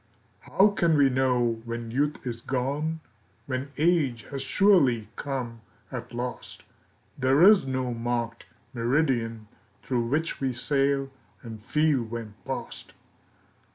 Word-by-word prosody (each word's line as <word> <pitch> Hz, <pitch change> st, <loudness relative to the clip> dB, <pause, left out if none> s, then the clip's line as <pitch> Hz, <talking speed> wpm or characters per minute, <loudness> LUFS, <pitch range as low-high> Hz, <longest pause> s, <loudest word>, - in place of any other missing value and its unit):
HOW 195 Hz, +2 st, +3 dB
can 170 Hz, -6 st, +2 dB
we 140 Hz, -2 st, +5 dB
know 125 Hz, -3 st, +1 dB
when 115 Hz, -1 st, -5 dB
youth 145 Hz, +4 st, -1 dB
is 115 Hz, -2 st, -4 dB
gone, 145 Hz, +6 st, -2 dB, 0.4 s
When 130 Hz, +1 st, -4 dB
age 150 Hz, -7 st, +2 dB
has 135 Hz, -1 st, -3 dB
surely 135 Hz, -, +3 dB
come 125 Hz, -5 st, -4 dB, 0.3 s
at 125 Hz, -1 st, -6 dB
last? 125 Hz, +1 st, -6 dB, 0.6 s
There 135 Hz, +4 st, +4 dB
is 195 Hz, -7 st, +7 dB
no 130 Hz, -2 st, -1 dB
marked 115 Hz, 0 st, -3 dB, 0.3 s
meridian 115 Hz, -3 st, 0 dB, 0.4 s
Through 120 Hz, -3 st, -1 dB
which 155 Hz, +5 st, -1 dB
we 130 Hz, -2 st, 0 dB
sail, 135 Hz, +1 st, 0 dB, 0.3 s
and 110 Hz, -3 st, -8 dB
feel 150 Hz, +3 st, +2 dB
when 115 Hz, -2 st, -6 dB
past. -, -, -6 dB
130 Hz, 120 wpm, -27 LUFS, 120-145 Hz, 0.6 s, is